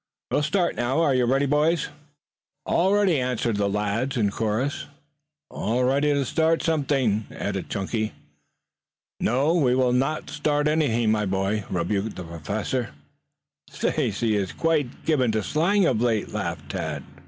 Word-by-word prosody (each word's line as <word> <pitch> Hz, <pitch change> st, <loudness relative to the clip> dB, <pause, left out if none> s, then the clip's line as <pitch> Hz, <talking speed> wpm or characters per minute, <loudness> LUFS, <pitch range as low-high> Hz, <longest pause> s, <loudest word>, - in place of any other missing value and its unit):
"We -, -, +1 dB
will -, -, +2 dB
start 170 Hz, +4 st, +1 dB
now. 120 Hz, +5 st, 0 dB
Are 145 Hz, -4 st, +3 dB
you 125 Hz, -1 st, +3 dB
ready, 135 Hz, +3 st, +2 dB
boys?" 150 Hz, +3 st, +2 dB, 0.8 s
"All 185 Hz, +3 st, +2 dB
ready," 200 Hz, -7 st, +3 dB
answered 125 Hz, -3 st, -1 dB
the 100 Hz, -1 st, +1 dB
lads 105 Hz, +6 st, -1 dB
in 105 Hz, -4 st, +2 dB
chorus. 110 Hz, +7 st, -2 dB, 0.6 s
"All 120 Hz, +3 st, -1 dB
ready 140 Hz, +3 st, +2 dB
to 140 Hz, -1 st, +1 dB
start 160 Hz, +4 st, +1 dB
something!" 135 Hz, -9 st, +1 dB
added -, -, -4 dB
Chunky. 110 Hz, +3 st, -2 dB, 1.1 s
"No, 135 Hz, +7 st, +2 dB
we 135 Hz, -8 st, +3 dB
will 130 Hz, -1 st, +2 dB
not 135 Hz, +5 st, -1 dB
start 150 Hz, 0 st, 0 dB
anything, 120 Hz, -8 st, +2 dB
my 105 Hz, -1 st, +1 dB
boy," 95 Hz, +2 st, -1 dB
rebuked 95 Hz, +4 st, -1 dB
the 90 Hz, -, -6 dB
Professor. 100 Hz, -, -3 dB, 0.8 s
"Stacy 110 Hz, +2 st, 0 dB
is 100 Hz, -2 st, -1 dB
quite 155 Hz, -6 st, -1 dB
given 130 Hz, -7 st, +2 dB
to 110 Hz, -1 st, 0 dB
slang 175 Hz, -, +2 dB
of 115 Hz, -8 st, +1 dB
late," 115 Hz, -4 st, +1 dB
laughed 85 Hz, -8 st, -4 dB
Tad. -, -, -4 dB
125 Hz, 150 wpm, -24 LUFS, 105-150 Hz, 1.1 s, Are